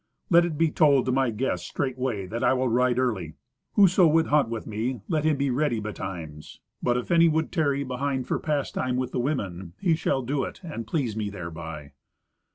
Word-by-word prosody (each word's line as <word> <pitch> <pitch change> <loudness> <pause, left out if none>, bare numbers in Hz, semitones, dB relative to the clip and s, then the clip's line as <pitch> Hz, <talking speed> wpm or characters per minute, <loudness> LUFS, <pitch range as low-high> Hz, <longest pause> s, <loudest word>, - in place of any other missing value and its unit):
"Let 170 0 +6
it 160 -3 -3
be 165 0 +2
told 145 -5 +4
to 130 - 0
my 135 -1 +2
guests 115 +4 -2
straightway 130 -7 -2
that 115 +6 -4
I - - +4
will 130 0 +1
ride 125 +1 +2
early. 105 -12 -1 0.4
Whoso 185 -3 +6
would 160 +1 +3
hunt 145 -5 +3
with 115 -1 -4
me, 115 +2 -3
let 155 -1 0
him 155 -2 +3
be 140 -1 0
ready 125 -3 +1
betimes. 90 -7 -7 0.2
But 120 0 +1
if 125 - -4
any 170 -1 +6
would 160 0 0
tarry 140 -5 +1
behind 130 0 -2
for - - 0
pastime 140 -4 -1
with 130 -1 -2
the - - -2
women, 95 - -3
he 175 -4 +2
shall 140 -4 0
do 135 +3 -1
it, - - -6
and 130 -10 -6
please 125 -7 -1
me 105 -2 -2
thereby." 80 -5 -7
130 Hz, 200 wpm, -26 LUFS, 110-150 Hz, 0.4 s, Let